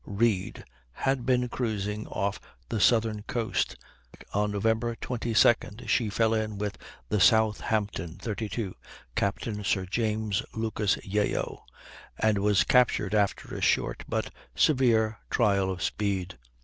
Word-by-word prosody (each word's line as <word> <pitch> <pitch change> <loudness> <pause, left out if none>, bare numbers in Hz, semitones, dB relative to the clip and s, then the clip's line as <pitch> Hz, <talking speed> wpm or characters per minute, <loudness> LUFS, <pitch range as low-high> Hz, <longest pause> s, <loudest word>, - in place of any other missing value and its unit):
Read, 100 -2 0 0.3
had 130 - -1
been 125 -1 +3
cruising 105 -4 -3
off 100 +1 -2 0.3
the 110 - -1
southern 110 -1 +3
coast; 115 -3 -1 0.6
on 105 0 +1
Nov. 100 0 -3
22d 115 0 +1
she 115 -3 +2
fell 110 +2 +2
in 110 -2 -1
with 105 0 -3 0.3
the 105 - +1
Southampton, 105 -4 +2
32, 105 -2 -4 0.4
Captain 105 +1 -2
Sir 95 -1 0
James 110 0 -1
Lucas 110 -2 0
Yeo, 105 +1 -1 0.5
and 110 -2 +2
was 100 0 +3
captured 115 -5 +3
after 105 -2 0
a - - -5
short - - +1
but - - -2 0.2
severe 115 -6 +3
trial 100 -5 +2
of 90 -1 -3
speed. 95 - -2
105 Hz, 125 wpm, -28 LUFS, 100-115 Hz, 0.6 s, been